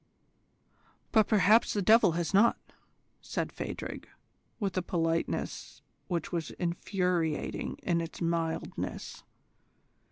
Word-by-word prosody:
"But 220 Hz, -2 st, +5 dB
perhaps 215 Hz, +2 st, +4 dB
the 205 Hz, -, 0 dB
devil 215 Hz, -4 st, +6 dB
has 170 Hz, +2 st, -2 dB
not," 220 Hz, +4 st, +5 dB, 0.6 s
said -, -, -3 dB
Phadrig, -, -, -6 dB, 0.5 s
with 200 Hz, -4 st, -2 dB
a 185 Hz, -, +1 dB
politeness 165 Hz, -2 st, -2 dB, 0.2 s
which 170 Hz, -4 st, -2 dB
was 165 Hz, -3 st, -2 dB
infuriating 175 Hz, -2 st, -1 dB
in 170 Hz, -2 st, +1 dB
its 165 Hz, -, -7 dB
mildness. 165 Hz, -1 st, -3 dB
175 Hz, 100 wpm, -30 LUFS, 165-200 Hz, 0.6 s, devil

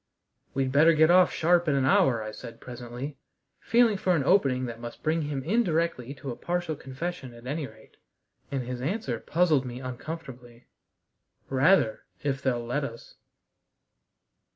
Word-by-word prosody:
"We'd 135 Hz, -1 st, 0 dB
better 155 Hz, +4 st, +6 dB
get 160 Hz, +1 st, +5 dB
off 180 Hz, 0 st, +6 dB
sharp 175 Hz, +1 st, +2 dB
in 145 Hz, -, +3 dB
an 135 Hz, -1 st, +2 dB
hour," 125 Hz, -4 st, +3 dB
I 110 Hz, -, -5 dB
said 115 Hz, +1 st, -10 dB
presently, 125 Hz, +3 st, -7 dB, 0.4 s
feeling 230 Hz, -3 st, +3 dB
for 185 Hz, -1 st, +2 dB
an 150 Hz, -, +1 dB
opening 135 Hz, -6 st, +3 dB
that 115 Hz, -2 st, -6 dB
must 120 Hz, 0 st, -9 dB
bring 160 Hz, +1 st, +1 dB
him 145 Hz, -3 st, -3 dB
indirectly 165 Hz, -, 0 dB
to 135 Hz, -1 st, -6 dB
a -, -, -5 dB
partial 175 Hz, 0 st, -2 dB
confession 135 Hz, -1 st, -6 dB
at 120 Hz, +1 st, -14 dB
any 145 Hz, +2 st, -3 dB
rate. -, -, -18 dB, 0.5 s
And 135 Hz, -2 st, -2 dB
his 125 Hz, 0 st, -5 dB
answer 135 Hz, -, -2 dB
puzzled 160 Hz, -3 st, +2 dB
me 125 Hz, -1 st, -6 dB
uncomfortably: 130 Hz, -2 st, -8 dB, 0.9 s
"Rather! 135 Hz, -, +3 dB, 0.2 s
If 135 Hz, -2 st, -1 dB
they'll 120 Hz, -3 st, 0 dB
let 130 Hz, +5 st, -1 dB
us." 115 Hz, -4 st, -8 dB
135 Hz, 155 wpm, -27 LUFS, 125-165 Hz, 0.9 s, better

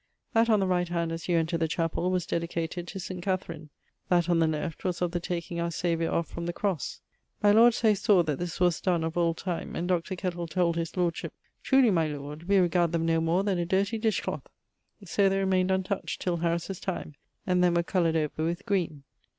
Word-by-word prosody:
That 230 Hz, 0 st, +4 dB
on 215 Hz, -2 st, +5 dB
the 195 Hz, -, +1 dB
right 180 Hz, -2 st, 0 dB
hand 170 Hz, -1 st, -1 dB
as 165 Hz, +1 st, -5 dB
you 175 Hz, -, +3 dB
enter 165 Hz, +1 st, 0 dB
the 165 Hz, -, +1 dB
chapell 165 Hz, +2 st, -1 dB
was 185 Hz, -2 st, 0 dB
dedicated 170 Hz, +1 st, -3 dB
to 195 Hz, -, -6 dB
St. 185 Hz, 0 st, -6 dB
Katharine, 170 Hz, -5 st, -3 dB, 0.4 s
that 175 Hz, -1 st, +3 dB
on 170 Hz, -, +3 dB
the 165 Hz, -, +4 dB
left 160 Hz, +1 st, -3 dB
was 180 Hz, -2 st, -1 dB
of 175 Hz, -1 st, 0 dB
the 175 Hz, -, -1 dB
taking 170 Hz, 0 st, -4 dB
our 170 Hz, 0 st, 0 dB
Saviour 165 Hz, 0 st, -1 dB
off 170 Hz, -, 0 dB
from 170 Hz, 0 st, -6 dB
the 175 Hz, -, -2 dB
crosse. 185 Hz, -6 st, -2 dB, 0.4 s
My 205 Hz, -, +6 dB
lord 230 Hz, +2 st, +6 dB
Say 220 Hz, -2 st, +3 dB
sawe 195 Hz, -2 st, +3 dB
that 150 Hz, -4 st, -2 dB
this 175 Hz, -1 st, -4 dB
was 175 Hz, -2 st, +2 dB
donne 175 Hz, -3 st, +1 dB
of 160 Hz, 0 st, -3 dB
old 170 Hz, -1 st, +1 dB
time, 180 Hz, -3 st, -4 dB
and 175 Hz, -, -2 dB
Dr. 180 Hz, +1 st, 0 dB
Kettle 175 Hz, -2 st, -3 dB
told 170 Hz, +1 st, +1 dB
his 165 Hz, +1 st, -3 dB
lordship 175 Hz, -2 st, -1 dB, 0.3 s
'Truly, 265 Hz, -4 st, +4 dB
my 165 Hz, -4 st, +2 dB
Lord, 150 Hz, +3 st, -7 dB
we 200 Hz, -, +5 dB
regard 175 Hz, -2 st, +2 dB
them 165 Hz, -1 st, +1 dB
no 165 Hz, 0 st, +2 dB
more 170 Hz, +4 st, +1 dB
then 195 Hz, -3 st, 0 dB
a 170 Hz, -, 0 dB
dirty 200 Hz, +4 st, +1 dB
dish 220 Hz, -1 st, +1 dB
clout'; -, -, -5 dB, 0.6 s
so 195 Hz, +2 st, +2 dB
they 195 Hz, -, 0 dB
remained 190 Hz, -1 st, +2 dB
untoucht, 190 Hz, +1 st, -1 dB
till 175 Hz, -2 st, -1 dB
Harris's 170 Hz, +2 st, -2 dB
time, 180 Hz, -5 st, -4 dB, 0.3 s
and 180 Hz, -1 st, +2 dB
then 175 Hz, -1 st, +3 dB
were 170 Hz, -, +2 dB
coloured 170 Hz, -2 st, +1 dB
over 155 Hz, 0 st, -1 dB
with 170 Hz, +4 st, -2 dB
green. 170 Hz, -8 st, -1 dB
175 Hz, 225 wpm, -28 LUFS, 165-185 Hz, 0.6 s, My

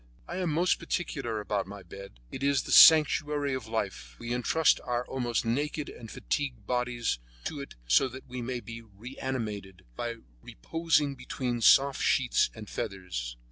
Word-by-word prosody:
I -, -, -5 dB
am 180 Hz, -2 st, -1 dB
most 175 Hz, +4 st, +2 dB
particular 130 Hz, -10 st, -3 dB
about 105 Hz, -1 st, -2 dB
my 100 Hz, 0 st, -9 dB
bed; 95 Hz, -6 st, -11 dB
it 130 Hz, -, -7 dB
is 140 Hz, 0 st, +2 dB
the -, -, -6 dB
sanctuary 150 Hz, -2 st, +6 dB
of 130 Hz, -4 st, -4 dB
life. 95 Hz, -, -4 dB
We 120 Hz, -, -4 dB
entrust 145 Hz, +6 st, +3 dB
our 125 Hz, 0 st, -2 dB
almost 120 Hz, -3 st, -2 dB
naked 145 Hz, +5 st, -1 dB
and 115 Hz, -2 st, -10 dB
fatigued 125 Hz, -6 st, -3 dB
bodies 125 Hz, -, -1 dB, 0.2 s
to 145 Hz, -3 st, -4 dB
it 140 Hz, -, -10 dB
so 60 Hz, -, +4 dB
that 130 Hz, +1 st, -10 dB
they 125 Hz, 0 st, -6 dB
may 120 Hz, 0 st, -3 dB
be 115 Hz, -1 st, -8 dB
reanimated 110 Hz, -3 st, -6 dB
by 120 Hz, -, -3 dB, 0.3 s
reposing 150 Hz, -, 0 dB
between 125 Hz, -2 st, -4 dB
soft 135 Hz, +4 st, +5 dB
sheets 125 Hz, -2 st, +2 dB
and 110 Hz, -2 st, -9 dB
feathers. 90 Hz, -15 st, -5 dB
120 Hz, 160 wpm, -29 LUFS, 105-140 Hz, 0.3 s, sanctuary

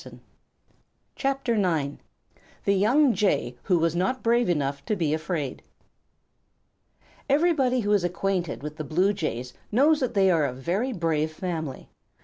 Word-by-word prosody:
THE -, -, -11 dB, 1.4 s
YOUNG 165 Hz, -9 st, 0 dB, 1.1 s
BLUE 255 Hz, -, +3 dB
JAY 145 Hz, -, 0 dB
WHO 180 Hz, -3 st, +3 dB
WAS 165 Hz, 0 st, +1 dB
NOT 190 Hz, +9 st, -1 dB
BRAVE 235 Hz, -2 st, +2 dB
ENOUGH 140 Hz, -4 st, -1 dB
TO 215 Hz, -, 0 dB
BE 160 Hz, -6 st, 0 dB
AFRAID 155 Hz, -4 st, -3 dB, 1.7 s
Everybody 275 Hz, -4 st, +3 dB
who 205 Hz, -1 st, -1 dB
is 205 Hz, -3 st, +3 dB
acquainted 175 Hz, -3 st, -2 dB
with 150 Hz, +1 st, -6 dB
the 155 Hz, -, -4 dB
Blue 180 Hz, +8 st, +1 dB
Jays 125 Hz, -, -4 dB, 0.2 s
knows 290 Hz, +7 st, +4 dB
that 255 Hz, -6 st, -2 dB
they 190 Hz, -1 st, +4 dB
are 160 Hz, -4 st, +3 dB
a 130 Hz, -, -2 dB
very 180 Hz, -, -2 dB
brave 160 Hz, -6 st, 0 dB
family. 160 Hz, -5 st, -5 dB
175 Hz, 135 wpm, -26 LUFS, 150-210 Hz, 1.7 s, knows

